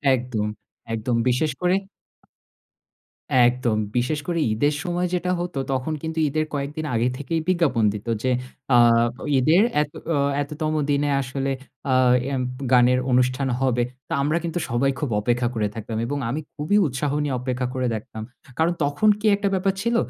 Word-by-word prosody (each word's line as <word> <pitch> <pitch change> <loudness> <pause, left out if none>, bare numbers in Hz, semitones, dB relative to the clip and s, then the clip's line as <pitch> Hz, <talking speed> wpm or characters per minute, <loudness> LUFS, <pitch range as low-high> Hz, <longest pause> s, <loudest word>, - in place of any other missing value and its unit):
একদম, 120 -4 -2 0.5
একদম, 115 +2 -1
বিশেষ 135 +5 +1
করে 180 +1 +3 1.7
একদম। 120 -3 0 0.2
বিশেষ 125 +5 0
করে, 170 -1 0
ঈদের 145 +7 +1
সময় 180 -1 -1
যেটা 180 0 0
হতো, 175 -5 -3
তখন 130 +4 -1
কিন্তু 160 0 -3
ঈদের 155 +2 0
কয়েকদিন 145 +2 -3
আগে 115 +2 +2
থেকেই 155 +4 -2
বিজ্ঞাপন 165 -11 +2
দিত 105 +2 -8 0.2
যে, 130 - +2 0.4
আ - - +7 0.6
ঈদের 155 +9 +4 0.2
এত 150 0 -3 0.2
অ - - +2 0.2
এততম 155 +2 -3 0.2
দিনে 145 0 +1
আসলে 135 +1 -3 0.4
আ - - +4 0.4
এম 130 - 0 0.3
গানের 125 0 +5
অনুষ্ঠান 125 +2 +2
হবে। 125 -2 +2 0.2
তো, - - -4
আমরা 150 +4 +1
কিন্তু 170 +1 -2
সবাই, 125 +4 +2
খুব 145 - -2
অপেক্ষা 120 +2 +1
করে 105 -2 +1
থাকতাম। 110 0 -5
এবং 145 +4 -2
আমি 140 +6 -2 0.2
খুবই 155 +7 +1
উৎসাহ 135 +2 -2
নিয়ে 140 -3 -1
অপেক্ষা 125 0 -2
করে 130 -1 -1
দেখতাম। 110 0 -7 0.3
কারণ, 165 +2 +2
তখন 145 +9 +2
কি 215 - -6
একটা 200 0 -1
ব্যাপার 190 +1 +1
ছিল 235 +2 0
140 Hz, 160 wpm, -23 LUFS, 125-160 Hz, 1.7 s, আ